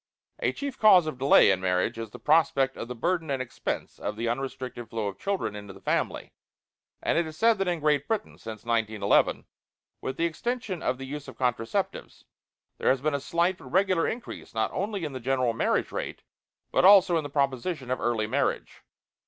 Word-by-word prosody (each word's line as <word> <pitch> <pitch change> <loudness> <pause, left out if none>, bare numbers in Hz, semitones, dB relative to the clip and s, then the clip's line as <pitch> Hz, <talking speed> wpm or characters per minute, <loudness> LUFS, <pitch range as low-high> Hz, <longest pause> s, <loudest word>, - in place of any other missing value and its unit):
A - - +1
chief 280 -2 -6
cause 190 -6 +7
of 155 -5 -5
delay 135 -6 +6
in 95 -1 0
marriage 95 +5 0
is 115 -1 -5
the - - -10
prospect 150 -4 +3
of - - -6
the 125 - -6
burden 165 +5 -1
and 135 -1 0
expense 130 -2 -4
of 105 - -4
an 115 +1 -2
unrestricted 125 -2 -4
flow 115 -2 -3
of 100 - -6
children 195 - -2
into 100 -1 -8
the - - -14
family; - - -1 0.7
and - - +2
it 170 - 0
is 155 0 -9
said 225 +2 +4
that 195 - 0
in 175 -2 0
Great 150 -2 +1
Britain, 220 -2 -3
since 110 -1 -8
1911, 110 -3 +2 0.6
with 130 - -4
the 165 - +1
extension 210 +2 -3
of 125 - 0
the 135 - -7
use 145 +1 -7
of - - -10
contraceptives, 120 -3 -2 0.6
there - - +2
has 130 - +3
been 150 +3 0
a 140 - 0
slight 170 +5 0
but - - -13
regular 185 -2 +2
increase 235 - -6
not 110 0 0
only 200 -2 -2
in 145 - -5
the 130 - -5
general 130 -1 +1
marriage 115 - 0
rate - - -5 0.5
but - - +2
also 190 -2 +7
in 165 - +2
the 145 - -6
proposition 140 0 -1
of 130 - 0
early 115 -3 0
marriage. 110 - -1
135 Hz, 200 wpm, -27 LUFS, 115-175 Hz, 0.7 s, cause